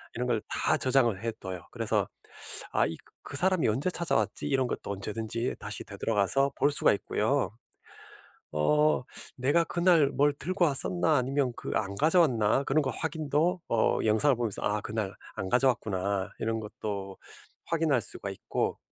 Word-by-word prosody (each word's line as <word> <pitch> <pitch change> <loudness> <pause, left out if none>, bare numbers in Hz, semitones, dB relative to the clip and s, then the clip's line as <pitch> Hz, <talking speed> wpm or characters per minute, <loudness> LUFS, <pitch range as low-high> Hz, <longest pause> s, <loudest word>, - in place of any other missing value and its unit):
이런 125 +1 -2
걸 115 -3 0
다 - - +2
저장을 120 -6 +2
해 115 - -1
둬요. 90 -3 -7
그래서 - - 0 0.7
'아 - - +3
이 80 - -5 0.3
그 145 - -3
사람이 185 -1 +2
언제 130 +11 0
찾아왔지?' 160 -4 -1
이런 135 -3 +1
것도 100 - -5
언제든지 110 +4 -3
다시 - - -5
되돌아가서 115 +6 0
볼 145 - +3
수가 145 - +5
있고요. 110 +6 -1 1.0
어. 150 - +2 0.4
'내가 145 +7 +2
그날 170 -3 +3
뭘 145 +1 +3
들고 180 +5 -1
왔었나 160 +2 +4
아니면 130 0 0
그 - - -6
안 100 -2 -2
가져왔나?' 140 - +3
그런 150 +3 +2
거 135 - -1
확인도 160 +2 -1
어. 115 -1 +2
영상을 110 +6 +3
보면서 115 -4 -2
아. 105 +1 0
'그날 105 -3 -3 0.2
안 95 - -4
가져왔구나.' 100 -7 +1
이런 115 0 -1
것도 100 -2 -6 0.5
확인할 160 -6 +1
수가 100 - -1
있고 95 - -3
125 Hz, 315 characters per minute, -28 LUFS, 105-150 Hz, 1.0 s, 수가